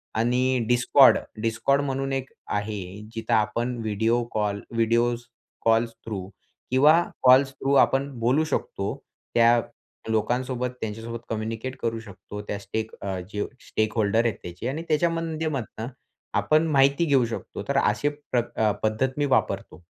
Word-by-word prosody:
आणि 125 +3 +2
Discord, 125 +2 +6 0.3
Discord 115 +5 +2
म्हणून 135 0 -2
एक 130 - -18 0.3
आहे 105 -1 -5 0.3
जिथे 115 - -2
आपण 115 +3 +1
video 110 +3 +1
call, 105 -1 -1
video 115 +1 +2 0.5
calls 115 +1 +3
through 100 -4 -5 0.4
किंवा 135 +4 +6 0.3
कॉल्स 130 +1 +6
थ्रू 135 +1 -1
आपण 135 +1 0
बोलू 125 +7 +3
शकतो. 100 -9 -2 0.4
त्या 120 0 +5 0.5
लोकांसोबत 125 +3 0
त्यांच्यासोबत 115 +2 -5
कम्युनिकेट 115 +3 -3
करू 115 -1 -1
शकतो, 105 -1 -9
त्या 105 0 -5
स्टेक 110 +2 -4
अ, 95 -2 -3
जो 105 0 -1 0.2
स्टेकहोल्डर 110 +1 +1
आहेत 115 - +1
त्याचे 90 +6 -6
आणि 155 +5 -4
त्याच्या 155 +2 +3
माध्यमातनं 155 -8 -3 0.5
आपण 155 +1 +3
माहिती 140 +4 +4
घेऊ 135 -5 +3
शकतो 115 - -6
तर - - 0
अशी 105 +7 +2
प्रकार 120 -7 -1
पद्धत 120 +5 0
मी 145 - +2
वापरतो. 130 -8 -1
115 Hz, 135 wpm, -25 LUFS, 110-135 Hz, 0.5 s, Discord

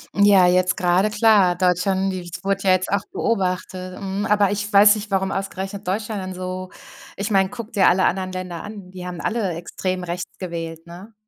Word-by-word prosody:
Ja, 200 -2 +6
jetzt 180 0 +3
gerade 185 +4 +2
klar. 210 -4 +4
Deutschland, 190 +2 +1
die 185 -1 -4
s 175 0 -9
wurde 195 0 -1
ja 190 - +4
jetzt 185 0 +1
auch 200 +1 +1
beobachtet, 185 -3 -2
mhm. 195 +1 -3
Aber 205 -2 +3
ich 205 +1 -3
weiß 205 +1 +7
nicht, 210 -1 -7
warum 190 0 0
ausgerechnet 195 0 -5
Deutschland 210 +2 -2
dann 185 0 -5
so 185 0 -5 0.5
Ich 200 +2 -3
meine, 195 -2 +3
gucke 235 -1 -8
dir 200 - +3
alle 185 +1 +4
anderen 185 0 0
Länder 180 -2 -6
an, 205 -3 -9
die 180 -1 -8
haben 175 -2 -6
alle 215 -6 -1
extrem 180 +2 -4
rechts 175 0 -6
gewählt, 165 -2 -6
ne? 185 +6 -12
190 Hz, 195 wpm, -22 LUFS, 180-200 Hz, 0.5 s, weiß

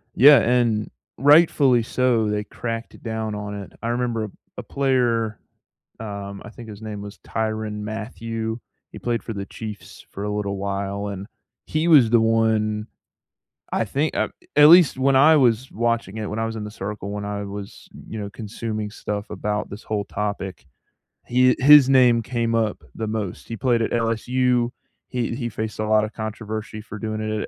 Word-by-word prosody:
Yeah, 140 0 +8
and 115 -3 +1 0.3
rightfully 140 -3 +5
so, 120 -3 +1
they 105 0 -1
cracked 115 +2 -6
down 110 -2 -3
on 105 0 -5
it. - - -14
I 115 - -2
remember 120 -2 -1
a - - -8 0.3
a - - -5
player, 120 -5 0 0.6
um, 100 -2 -6
I - - -9
think 115 -1 -11
his 105 -1 -9
name 105 -2 -6
was 100 0 -9
Tyrann 110 -1 -3
Mathieu. 110 +1 -4 0.3
He - - -9
played 120 -1 -2
for 115 - -5
the 100 -1 -5
Chiefs 105 -1 -9
for 100 - -6
a - - -2
little 100 -1 -2
while, 100 +1 -3
and 100 -1 -5 0.4
he 155 +2 -1
was 135 -9 +6
the 115 -1 +5
one 110 -1 +1 0.9
I - - +2
think 140 +9 -1
uh - - 0 0.3
at 150 0 +8
least 170 -5 +7
when 130 0 +3
I 155 +4 +7
was 125 -1 +2
watching 115 -3 -1
it, 105 -2 -4
when 105 +2 -3
I 115 - 0
was 115 0 -4
in 110 - -5
the 105 - -6
circle, 100 0 -6
when 105 0 -4
I 100 0 -3
was, 100 0 -8 0.2
you 110 - -6
know, 100 -1 -5
consuming 110 0 -5
stuff 105 -1 -5
about 105 +1 -3
this 105 +3 -9
whole 105 -2 -2
topic, 100 -7 -4 0.6
he 125 +1 +4
his 145 0 +8
name 125 -3 +5
came 115 -1 -1
up 110 -2 0
the 110 -1 -4
most, 105 -4 -4
he 115 - -4
played 120 0 +1
at - - -1
LSU. 120 +1 +1 0.4
He 120 -2 -2
he 120 -2 -3
faced 110 0 -5
a 110 - -1
lotta 110 0 +3
controversy 110 0 -5
for 110 0 -9
doing 110 -1 -3
it 110 0 -2
110 Hz, 180 wpm, -23 LUFS, 105-120 Hz, 0.9 s, Yeah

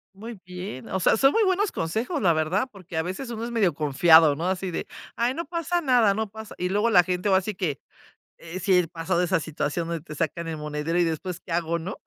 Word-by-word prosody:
Muy 220 0 -9
bien, 180 -7 -7
o 190 - -1
sea, - - +4
son 270 +3 +5
muy 450 - +3
buenos 385 +1 +1
consejos, 220 - -2
la 170 -4 +4
verdad, 170 +10 0
porque 185 -4 -9
a 160 - +1
veces 190 +9 -5
uno 230 -1 -5
es 240 - -4
medio 200 -9 +2
confiado, 155 +1 +5
¿no? 170 +4 -3
Así 185 -1 -2
de: - - -4 0.3
"Ay, 235 +3 +1
no 335 +3 -4
pasa 340 +2 -1
nada, 245 -8 +4
no 220 0 -2
pasa", 220 +1 -10
y 180 0 -2
luego 205 +4 +2
la 180 -5 +6
gente 180 +3 -1
ahora 190 0 +4
si 210 +2 -4
que 165 -7 -2 0.8
sí, 185 -1 +3
he 175 -2 +2
pasado 170 +2 -1
esa 180 -1 +1
situación, 160 +1 -3
te 150 -2 -9
sacan 165 +2 -2
el 160 -1 -4
monedero 150 +3 -3
y - - +4
después 170 +2 -3
qué 175 - -12
hago, 170 0 0
¿no? 185 +4 -6
180 Hz, 235 wpm, -25 LUFS, 165-220 Hz, 0.8 s, la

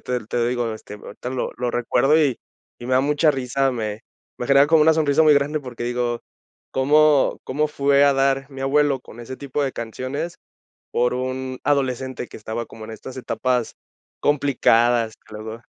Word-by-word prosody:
te 125 -3 -3
te - - -4
lo 120 - +2
digo, 120 -2 -1
este, 105 -1 -10
ahorita 105 +4 -8
lo 130 - -2
lo 120 0 -1
recuerdo 125 +5 +2
y 140 -6 +2 0.4
y 120 - -8
me 130 - -2
da 130 - +5
mucha 150 +3 +3
risa, 135 0 0
me 110 -3 -4 0.4
me 125 - -3
genera 140 +1 +6
como 160 0 +5
una 160 0 +5
sonrisa 155 -1 +3
muy 155 -1 +6
grande, 145 +2 +1
porque 120 -3 -7
digo: 120 -1 -1 0.5
"¿Cómo 145 +1 +4
cómo 150 +3 0
fue 140 -1 +3
a 140 - +5
dar 135 0 +1
mi 135 -1 -9
abuelo 140 0 +2
con 120 -1 -13
ese 130 +2 -7
tipo 140 +1 -3
de 135 - -1
canciones 130 +8 -5 0.6
por 125 +1 +1
un 130 0 -4
adolescente 130 -3 -1
que - - -11
estaba 110 +2 -5
como 110 -1 -11
en 110 - -9
estas 125 +4 -9
etapas 125 -1 -1 0.5
complicadas?". 120 -5 +2
Que 110 - -10
luego, 110 +1 -6
eh - - -23
130 Hz, 190 wpm, -22 LUFS, 120-140 Hz, 0.6 s, genera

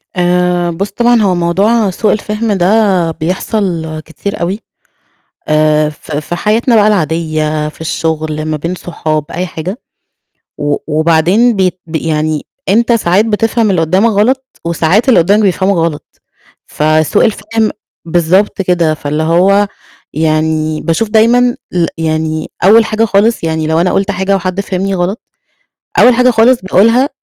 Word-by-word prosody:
آآ، 180 0 +1
بُصّ، 195 +4 -4
طبعًا 240 -1 +2
هو 190 -3 +2
موضوع 195 +5 +1
سوء 210 +4 0
الفِهم 215 +1 -2
ده 190 -2 +2
بيحصل 165 -1 -3
كتير 200 +5 -6
أوي، 185 +5 -2 0.9
آآ 155 0 +2
ف 150 - -12 0.2
ف - - -2
في 155 +3 -4
حياتنا 225 +6 +1
بقى 210 -1 +4
العادية، 155 -4 -1
في 155 - -15
الشُّغل 155 -1 -3
ما 155 0 -2
بين 170 +4 -4
صحاب 155 -4 -3
أي 180 +2 -3
حاجة، 180 +7 -6 0.8
و 145 0 -1
وبعدين 170 +9 +2
بيت 185 -2 0
بي 160 -1 -3
يعني 155 -1 -1 0.2
أنت 235 +4 +3
ساعات 205 -2 +2
بتفهم 225 0 0
اللي 180 -3 +1
قُدّامك 185 +8 +2
غلط، 250 +6 +1 0.2
وساعات 170 - +1
اللي 235 - +5
قُدّامك 200 +6 +2
بيفهمك 195 0 +1
غلط، 165 -3 -4 0.4
فسوء 155 0 +1
الفِهم 220 0 -1 0.3
بالضبط 175 +5 +1
كده، 175 -4 +1
فاللي 150 0 -3
هو 190 +5 +3 0.5
يعني 155 0 0
باشوف 170 +6 -1
دايمًا 240 +3 +3 0.2
ال 175 -2 +1
يعني 155 -1 -2
أول 220 +4 +6
حاجة 220 +1 0
خالص 215 +1 +1
يعني 160 -1 -1
لو 160 +1 +1
أنا 180 - +1
قُلت 200 +1 0
حاجة 190 +1 0
وحد 185 +1 -2
فهمني 195 0 -2
غلط، 180 +5 -2 0.8
أول 245 0 +6
حاجة 250 +1 +3
خالص 235 +2 +3
باقولها 230 +9 +3
180 Hz, 150 wpm, -12 LUFS, 160-210 Hz, 0.9 s, أول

